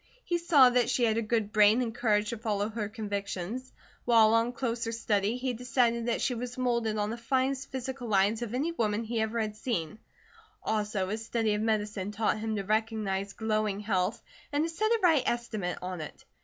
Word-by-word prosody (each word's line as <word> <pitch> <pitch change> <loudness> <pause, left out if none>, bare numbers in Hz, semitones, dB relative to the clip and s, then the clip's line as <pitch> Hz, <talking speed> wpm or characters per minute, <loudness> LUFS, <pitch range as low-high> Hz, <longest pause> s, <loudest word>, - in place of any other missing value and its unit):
He 345 -1 0
saw 295 -7 +6
that 245 -1 +2
she 250 -1 +1
had 225 -1 +3
a - - 0
good 215 -1 -1
brain 215 +2 +6
and 235 -3 -1
courage 210 -3 +1
to 235 - -4
follow 210 -2 -1
her 215 -2 -4
convictions, 205 +2 -4 0.3
while 225 -2 +5
on 230 +1 +3
closer 235 -2 -2
study 215 -1 0
he 255 0 -2
decided 235 -1 +1
that 235 - 0
she 255 - +1
was 245 +1 -5
moulded 235 -4 0
on 210 0 -1
the 235 - -5
finest 265 +2 0
physical 260 -1 -5
lines 205 +2 +2
of 240 0 -3
any 295 +6 0
woman 225 -7 0
he 225 0 -2
ever 220 +1 -1
had 215 -1 -2
seen, 215 -5 -3 0.6
also 210 -3 -1
his 220 +2 -3
study 225 -2 0
of 210 - -1
medicine 210 -3 -1
taught 215 0 0
him 220 0 -2
to 200 - -2
recognize 210 -2 -1
glowing 215 -2 -1
health, 195 -1 -1 0.3
and 290 +1 +1
to 330 - -7
set 435 +6 +1
a 460 0 +3
right 325 -6 +5
estimate 215 -7 -2
on 180 -2 -4
it. 150 - -9
225 Hz, 200 wpm, -29 LUFS, 210-245 Hz, 0.6 s, saw